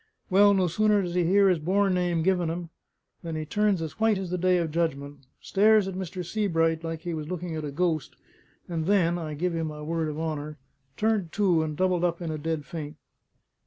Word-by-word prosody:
Well, 200 +1 +6
no 190 -1 +2
sooner 205 +4 +2
does 175 -1 -4
he 180 - +2
'ear 195 +4 +4
his 180 -3 +3
born 190 +4 +1
name 175 -2 0
given 180 -2 +1
him, 170 0 -5 0.5
than 165 -2 -5
he 155 0 -3
turns 205 0 +1
as 160 - -7
white 220 -2 +3
as 190 -2 -5
the 180 - 0
Day 185 +1 +3
of 165 -3 -1
Judgment, 145 -3 -2 0.2
stares 210 0 +4
at 190 - -4
Mr. 180 -1 -5
Sebright 165 -5 0
like 165 -1 -4
he 175 -2 -4
was 155 -2 -5
looking 175 -2 -4
at 155 - -4
a 150 - -3
ghost, 160 +1 -1 0.5
and 165 -2 -3
then 175 -4 +2
(I 155 -2 -5
give 175 +3 -1
you 165 -1 -1
my 150 -1 -5
word 160 0 -1
of 150 +1 -5
honour) 155 -1 -4 0.4
turned 210 -6 0
to, 185 -6 +3
and 155 -1 -3
doubled 185 -2 +1
up 170 -1 0
in 170 -3 -4
a 155 - -4
dead 160 -1 -3
faint. 150 -2 -6
170 Hz, 220 wpm, -27 LUFS, 160-185 Hz, 0.5 s, Well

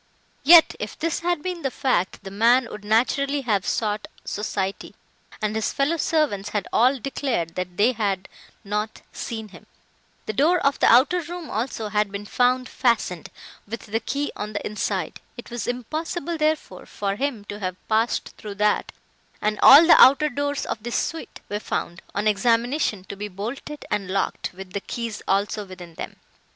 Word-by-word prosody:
Yet, 325 +3 +8
if - - -5
this 325 0 -1
had 345 -3 -1
been 360 -2 -3
the 270 - 0
fact, 255 -10 -1
the 195 - -8
man 235 +4 +4
would 210 - -8
naturally 275 +6 +1
have 210 -7 0
sought 210 -2 -1 0.2
society, 200 -2 -3 0.5
and 215 0 0
his 220 -1 0
fellow 290 +4 +1
servants 290 -12 0
had 205 -2 -2
all 255 +4 +4
declared 245 - -2
they 185 +6 +1
had 200 -5 -2 0.4
not 210 +2 -3
seen 220 -2 -5
him; - - -15 0.6
the 215 - -3
door 315 - +4
of 280 0 +1
the - - +4
outer 275 +10 +5
room 345 0 -7
also 225 -1 -3
had 210 -1 +1
been 200 +1 -5
found 250 +3 +2
fastened, 225 - 0 0.4
with 230 +3 -5
the 225 +1 -1
key 285 +4 -2
on 210 +1 -5
the 205 - -4
inside; 200 -4 -2 0.2
it 240 - -10
was 240 -3 -4
impossible, 315 +7 -3
therefore, 310 0 -1
for 200 -1 -2
him 245 -4 -2
to 205 0 -7
have 185 -2 -3
passed 225 +2 +1
through 210 -2 -7
that, 210 +1 +1 0.5
and 210 0 -1
all 285 +5 +10
the 335 - +8
outer 280 +3 +7
doors 285 +1 -2
of 215 - -4
this 240 +2 -2
suite 325 - -4
were 205 - -3
found, 175 -4 -4
on 205 +1 0
examination, 230 +1 +1
to 200 - -8
be 205 +1 -5
bolted 230 +9 -6
and 200 -3 -1
locked, 195 +1 -1
with 190 0 -10
the 200 - -2
keys 230 -3 -5
also 200 +2 0
within 185 -3 -11
them. - - -7
220 Hz, 175 wpm, -24 LUFS, 205-275 Hz, 0.6 s, all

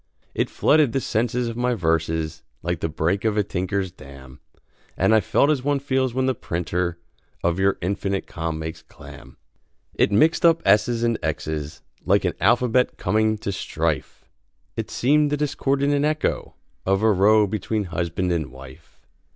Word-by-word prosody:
It - - -1
flooded 150 -6 +3
the 135 - +1
sense 115 -1 -1
of 120 -2 -1
my 125 +1 0
verses, 80 -3 -1 0.2
Like 85 0 -2
the 80 - -2
break 80 +5 -1
of 110 -2 0
a 105 - +3
tinker's 95 0 -2
dam, 65 -3 -13 0.6
And 95 +4 +3
I 110 - +6
felt 120 +7 +2
as 135 -4 -1
one 145 0 +1
feels 130 -2 0
when 130 +2 0
the 130 - +2
printer 85 -3 -3 0.5
Of 85 +1 +1
your 95 0 +2
"infinite 100 +1 -2
calm" 80 -2 -4
makes 80 +1 -6
clam. - - -14 0.6
It - - +2
mixed 155 +11 +3
up 165 -1 +4
s's 105 +4 +3
and 115 -1 +1
x's 75 0 -4 0.2
Like - - +2
an - - +1
alphabet 120 +4 +2
coming 110 0 +1
to 100 - -4
strife. 80 -5 -3 0.5
It - - -4
seemed 150 +4 +2
the 150 - 0
discordant 140 -1 0
echo 155 +1 -1 0.3
Of 95 +2 +1
a 110 - +5
row 105 +2 +4
between 105 +1 -2
husband 90 0 -2
and 80 -4 -1
wife. 65 0 -15
100 Hz, 165 wpm, -23 LUFS, 85-125 Hz, 0.6 s, I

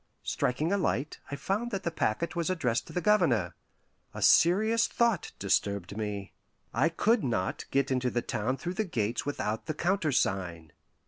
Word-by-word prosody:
Striking 150 +9 0
a 200 - +2
light, 150 -4 -1
I 140 - -3
found 205 +10 -2
that 195 -4 -4
the 170 - -1
packet 165 +2 -1
was 170 0 -1
addressed 125 -11 0
to - - -10
the 180 - -1
Governor. 130 - +3 0.6
A - - -3
serious 215 +8 +5
thought 235 -7 +1
disturbed 100 -1 0
me: 105 -2 -4 0.4
I 165 - +3
could 215 +6 +2
not 110 -8 -1
get 135 0 +1
into 130 -1 +1
the 120 -1 -1
town 120 +6 -1
through 175 +7 -4
the 215 - 0
gates 115 - -2
without 110 -5 -2
the 155 - -2
countersign. 95 - 0
140 Hz, 170 wpm, -29 LUFS, 110-180 Hz, 0.6 s, serious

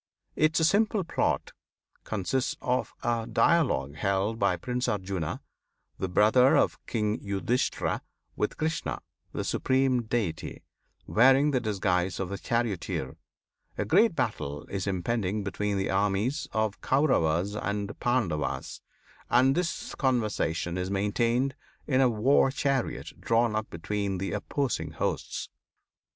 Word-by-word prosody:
Its 160 +1 +3
simple 210 +1 +2
plot 165 - -1 0.5
consists 110 +6 -1
of 125 +1 -1
a 115 -1 0
dialogue 125 - +2
held 100 +6 0
by - - +2
Prince 125 0 -2
Arjuna, 95 -5 -2 0.6
the 95 - -2
brother 110 +7 +5
of - - +1
King 105 -2 -1
Yudhisthira, 100 +5 -1 0.3
with 105 - -2
Krishna, 160 0 -2 0.3
the - - -3
Supreme 130 -1 +1
Deity, 110 -8 -3 0.4
wearing 135 +5 +5
the 130 - +2
disguise 95 -4 0
of 95 -1 -3
a 100 - -4
charioteer. 110 - -2 0.6
A - - -1
great 205 +2 +4
battle 75 - -2
is 100 0 -3
impending 100 +1 -1
between 100 +1 -2
the 95 - -1
armies 105 +8 0
of 110 -1 +1
the - - -23
Kauravas 100 - +2
and 105 0 -3
Pandavas, 115 -12 -1 0.5
and 130 +2 +5
this 175 +2 -2
conversation 105 - 0
is 90 +1 -2
maintained 115 +7 +1 0.3
in 130 -2 +2
a 130 - +5
war 125 +5 +3
chariot 135 -1 -1
drawn 115 -1 +2
up 110 0 -2
between 100 +3 -2
the 95 +2 -3
opposing 140 -5 -2
hosts. - - -3
110 Hz, 125 wpm, -28 LUFS, 95-130 Hz, 0.6 s, brother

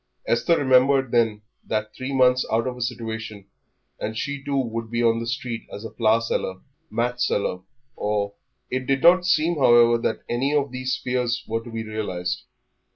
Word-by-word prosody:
Esther 120 +8 +2
remembered 130 -1 +4
then 110 -3 +2 0.2
that 110 0 -3
three 130 +1 -5
months 130 -1 +4
out 115 +1 +2
of 130 -1 -3
a 125 - -9
situation 110 -4 -4 0.5
and 110 +1 -4
she 140 +3 -3
too 140 0 -1
would 115 -3 -2
be 120 +1 0
on 115 0 +3
the 115 - -4
street 120 -1 -4
as 105 - -7
a - - -6
flower 110 -1 +3
seller, 105 -4 -2 0.3
match 125 +1 -1
seller, 100 -5 0 0.4
or 105 -1 -1 0.4
It 130 0 -2
did 135 0 +1
not 180 +1 +6
seem, 170 -1 +2
however, 120 -2 +6
that - - -2
any 135 +5 0
of 140 -2 +1
these 130 0 -2
fears 125 -1 -1
were 115 +1 -2
to 120 - -10
be 115 -1 -4
realised. 95 -4 -3
120 Hz, 180 wpm, -24 LUFS, 110-130 Hz, 0.5 s, not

